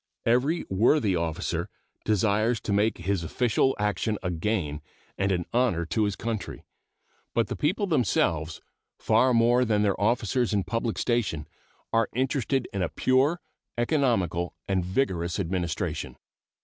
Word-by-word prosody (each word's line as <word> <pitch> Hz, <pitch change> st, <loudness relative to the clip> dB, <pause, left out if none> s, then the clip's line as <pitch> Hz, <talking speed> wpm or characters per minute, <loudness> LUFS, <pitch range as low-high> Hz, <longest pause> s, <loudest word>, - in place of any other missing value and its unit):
Every 130 Hz, +8 st, +2 dB
worthy 105 Hz, +1 st, +3 dB
officer 85 Hz, -2 st, -2 dB, 0.4 s
desires 110 Hz, +2 st, +2 dB
to 100 Hz, -, -2 dB
make 105 Hz, +2 st, +2 dB
his 90 Hz, 0 st, -1 dB
official 125 Hz, +8 st, +1 dB
action 105 Hz, +1 st, -1 dB
a 90 Hz, -, -1 dB
gain 85 Hz, -4 st, -2 dB, 0.3 s
and 100 Hz, 0 st, 0 dB
an 90 Hz, -2 st, 0 dB
honor 115 Hz, -9 st, +2 dB
to 105 Hz, +6 st, 0 dB
his 100 Hz, -2 st, -1 dB
country; 115 Hz, -3 st, -4 dB, 0.7 s
but -, -, +1 dB
the -, -, -2 dB
people 185 Hz, +8 st, 0 dB
themselves, 85 Hz, -, 0 dB, 0.4 s
far 120 Hz, +4 st, +3 dB
more 120 Hz, +1 st, +4 dB
than 105 Hz, -3 st, +2 dB
their 100 Hz, -1 st, 0 dB
officers 115 Hz, +2 st, +1 dB
in 100 Hz, -, +1 dB
public 115 Hz, +4 st, -2 dB
station, 105 Hz, -11 st, -1 dB, 0.5 s
are 115 Hz, -1 st, +2 dB
interested 130 Hz, 0 st, 0 dB
in 100 Hz, -, -2 dB
a 85 Hz, -, 0 dB
pure, 135 Hz, +7 st, +2 dB, 0.4 s
economical, 115 Hz, -, 0 dB
and 95 Hz, -2 st, +1 dB
vigorous 90 Hz, -3 st, -1 dB
administration. 90 Hz, -2 st, -2 dB
110 Hz, 135 wpm, -27 LUFS, 90-120 Hz, 0.7 s, more